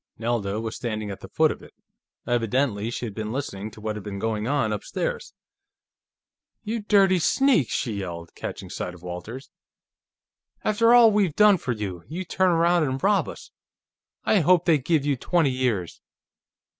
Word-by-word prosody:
Nelda 110 -3 -1
was 110 0 -4
standing 110 -3 -4
at 95 - -7
the - - -10
foot - - +3
of - - -8
it. - - -16 0.5
Evidently 115 -2 0
she 120 - -4
had 110 - -6
been 110 +1 -4
listening 110 -6 -4
to 110 - -14
what 110 0 -3
had 105 - -6
been 100 0 -6
going 110 +1 -2
on 135 -6 +1
upstairs. 105 - -4 1.3
"You 225 +2 -2
dirty 195 -3 +4
sneak!" 230 - +3
she 115 - -2
yelled, 85 -3 -7
catching - - -7
sight 90 - -5
of 90 - -16
Walters. 90 +9 -7 1.1
"After 230 +3 +4
all 235 -2 +7
we've 200 -7 +1
done 210 -2 +6
for 135 - -4
you, 95 -6 -5
you 180 +4 -5
turn 185 +1 +1
around 170 0 +3
and 135 -2 -2
rob 200 0 +2
us! - - -11 0.7
I 215 - +3
hope 180 +1 +4
they 160 -4 +4
give 145 +1 0
you 145 -1 +1
twenty 160 +1 +1
years!" 120 -9 -2
125 Hz, 170 wpm, -25 LUFS, 105-175 Hz, 1.3 s, all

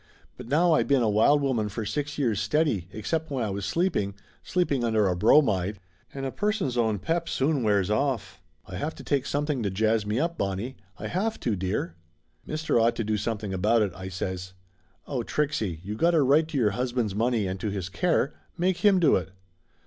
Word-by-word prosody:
But 125 - -10
now 165 +6 +3
I - - +4
been 140 -3 +2
a 110 - +2
wild 140 +8 +4
woman 120 -6 0
for 105 +2 -4
six 145 +6 -3
years 115 -9 +1
steady, 150 - +1
except 160 +10 -3
when 135 -4 -1
I 105 - -2
was 100 0 -3
sleeping 165 - 0 0.3
sleeping 145 -8 0
under 110 -3 +2
a 90 - +1
bromide! 105 -2 +3 0.3
And 135 -1 -5
a 135 - -2
person's 205 - -1
own 110 -3 +1
pep 165 - -1
soon 140 +1 +1
wears 105 -3 +2
off. 110 -7 -1 0.2
I 90 - -7
have 155 - -3
to - - -10
take 140 -3 0
some 145 +1 -1
thing 145 -5 -1
to 100 - 0
jazz 110 +3 +1
me 105 +3 -1
up, 170 +3 -1
Bonnie; 100 +7 -2 0.2
I - - -7
have 215 +5 -1
to, 115 -4 0
dear 95 -2 -2 0.3
!" 80 - -41
"Mister 155 -5 0
ought 115 +1 +3
to 115 - -2
do 110 0 0
something 105 -1 -3
about 105 +4 +3
it," 100 -4 -2
I 95 0 -7
says. 95 0 -4 0.5
"Oh, 130 -4 -2
Trixie, 110 - -1
you 100 +2 -4
got 170 +10 +2
a 155 - +4
right 150 +4 +4
to 160 -3 -4
your 110 -5 +3
husband's 120 -2 -1
money 115 0 +1
and 95 0 -3
to 105 - -2
his 100 -3 -3
care. 155 - +1 0.2
Make 180 +1 +1
him 205 -3 +4
do 165 -5 +5
it!" 95 0 -5
115 Hz, 215 wpm, -26 LUFS, 100-145 Hz, 0.5 s, do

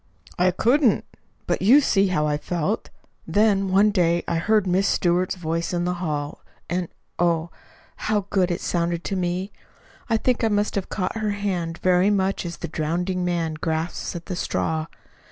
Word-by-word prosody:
"I 180 +1 +5
couldn't. 240 - +2 0.4
But - - -1
you 240 +9 +7
see 200 -8 +3
how 180 -5 +1
I 150 -1 +1
felt. 175 +7 -2 0.4
Then, 205 -2 +2
one 200 +3 +5
day 170 -3 +2
I 170 - 0
heard 215 +4 +2
Miss 185 +2 +2
Stewart's 180 +1 +1
voice 165 0 -2
in 175 0 0
the 180 - 0
hall, 150 -4 -3 0.3
and, 175 0 -1 0.3
oh, 170 -1 +1 0.5
how 210 -2 0
good 190 -3 +2
it 175 - -2
sounded 170 -1 -1
to 195 - -2
me! 185 +2 -2 0.6
I 225 - +3
think 250 +1 0
I - - +4
must 205 -1 +1
have 195 -2 -3
caught 185 +2 -2
her 215 -2 -1
hand 180 -5 -2
very 185 +1 +4
much 195 -3 0
as 170 - -6
the 170 - -5
drowning 175 +4 -2
man 170 -2 -1
grasps 160 +3 -3
at 170 - -6
the 185 - -4
straw. 160 -2 -1
180 Hz, 175 wpm, -23 LUFS, 170-200 Hz, 0.6 s, you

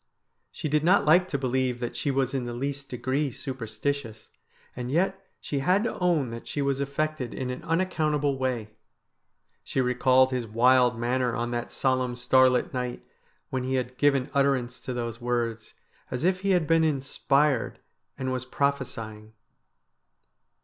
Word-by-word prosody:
She - - -4
did 150 +1 +1
not 180 +4 +4
like 175 +4 +5
to 150 - -1
believe 130 -2 0
that 120 -1 -4
she 145 - -1
was 135 0 0
in 130 -3 -1
the 120 0 -5
least 140 +2 -3
degree 130 +4 -1
superstitious, 115 -1 -4 0.4
and 125 0 -4
yet 190 +6 0 0.2
she 140 - -3
had 185 +9 +2
to 235 - -3
own 165 -9 +1
that 115 0 -8
she - - -4
was 140 -1 0
affected 140 -2 -2
in 130 -1 -3
an 125 - -6
unaccountable 155 -4 0
way. 120 -5 -2 0.9
She - - -3
recalled 130 +1 +4
his 125 -3 -2
wild 125 +2 +4
manner 120 +1 0
on 120 0 -2
that 120 0 -3
solemn 130 -2 0
starlit 130 0 +3
night 125 -1 -4 0.5
when 130 -1 -1
he 130 +1 -1
had 125 0 -2
given 140 -1 +2
utter 140 -1 +4
ance 125 -1 -5
to 130 - -5
those 115 -1 -4
words, 120 -2 -2 0.3
as 125 +3 -3
if 185 +1 +2
he 200 +1 -2
had 180 -4 +3
been 165 +1 +3
inspired 140 -2 +1 0.4
and 130 -1 -2
was 130 -1 -2
prophesying. 115 -6 -3
130 Hz, 165 wpm, -27 LUFS, 125-145 Hz, 0.9 s, like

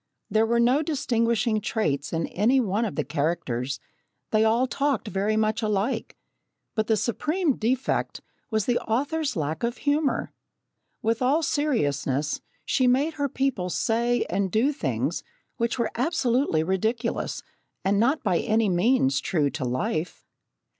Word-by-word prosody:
There 220 +1 +3
were 235 +1 +2
no 250 +5 +4
distinguishing 230 -7 +1
traits 150 -11 -1
in 165 0 0
any 235 +8 +3
one 220 -1 0
of 210 - -4
the 150 - 0
characters 140 -5 -2 0.5
they 215 0 +4
all 230 +3 +3
talked 275 -3 -1
very 205 +2 0
much 215 +1 +1
alike. 215 +3 -1 0.6
But 220 -1 0
the 220 - +3
supreme 300 - 0
defect 250 +4 -1 0.3
was 220 -4 0
the 245 -1 +2
author's 285 +6 -1
lack 155 0 -2
of 235 +1 -1
humour. 290 0 0 0.7
With 225 +2 +1
all 280 +6 +3
seriousness, 145 - 0 0.2
she 255 -2 +2
made 275 +6 +2
her 285 -2 -1
people 250 -9 -1
say 235 +4 +1
and 190 +1 -1
do 250 - +2
things 290 - -2 0.4
which 235 +1 0
were 235 -3 0
absolutely 250 - +1
ridiculous 220 +7 -1 0.4
and 200 +1 +3
not 270 +8 +2
by 185 -6 +2
any 220 -1 +2
means 175 - +2
true 150 -5 +1
to - - -4
life. 130 +7 -2
225 Hz, 145 wpm, -25 LUFS, 190-255 Hz, 0.7 s, no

